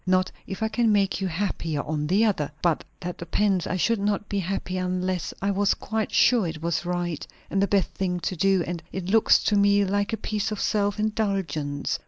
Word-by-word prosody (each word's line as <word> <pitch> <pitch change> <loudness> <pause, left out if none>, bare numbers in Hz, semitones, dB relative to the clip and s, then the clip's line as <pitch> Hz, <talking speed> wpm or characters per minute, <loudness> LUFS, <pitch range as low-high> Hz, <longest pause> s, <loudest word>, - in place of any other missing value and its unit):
"Not 185 0 +2 0.2
if 195 +3 -4
I - - +2
can 230 0 +2
make 200 -1 +2
you 190 - 0
happier 165 -4 -2
on 150 -1 -2
the 200 +7 +3
other." 150 -9 0
"But 170 -3 +2 0.2
that 180 -1 -5
depends. 185 +2 +1
I 185 - -1
should 225 +4 +1
not 205 0 -1
be 200 - -1
happy 185 0 -3
unless 185 -1 -1
I 200 - +2
was 200 0 +2
quite 220 0 -3
sure 230 -7 +4
it 160 -1 -5
was 170 +2 -1
right, 175 -3 -2 0.2
and 195 - +1
the 200 - +3
best 200 -2 +2
thing 180 -2 -2
to 185 - -2
do; 190 +1 +3
and 170 -1 -4
it 190 -2 -4
looks 225 0 +5
to 210 - +2
me 200 0 +4
like 200 +2 0
a 225 - -1
piece 215 0 -2
of 210 - -3
self 205 -1 +1
indulgence. 195 -10 -1
195 Hz, 215 wpm, -25 LUFS, 175-205 Hz, 0.2 s, looks